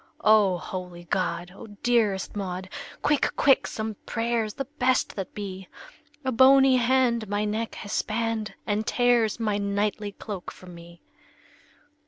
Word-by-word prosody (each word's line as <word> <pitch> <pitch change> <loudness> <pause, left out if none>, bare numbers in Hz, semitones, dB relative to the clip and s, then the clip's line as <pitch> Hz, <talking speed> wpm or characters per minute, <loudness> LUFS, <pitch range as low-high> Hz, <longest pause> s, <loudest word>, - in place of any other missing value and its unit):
"O 210 -4 +5
holy 180 0 -7
God! 175 0 -2
O 225 - -10 0.2
dearest 220 -6 +1
Maud, 185 -2 -4 0.3
Quick, 295 -1 +2
quick, 270 -2 +4
some 220 0 -4
prayers, 230 -2 -1
the 275 - -3
best 260 -2 0
that 190 -2 -6
be! 190 -2 -6 0.6
A 260 - +1
bony 265 +1 +6
hand 240 -3 +2
my 205 +1 0
neck 220 +2 -3
has 205 - -7
spanned, 225 -1 -2
And 210 +1 -1
tears 240 -3 +2
my 210 -3 0
knightly 205 +1 -1
cloak 200 -4 -7
from 180 -1 -13
me!" 170 0 -14
215 Hz, 140 wpm, -26 LUFS, 195-235 Hz, 0.6 s, bony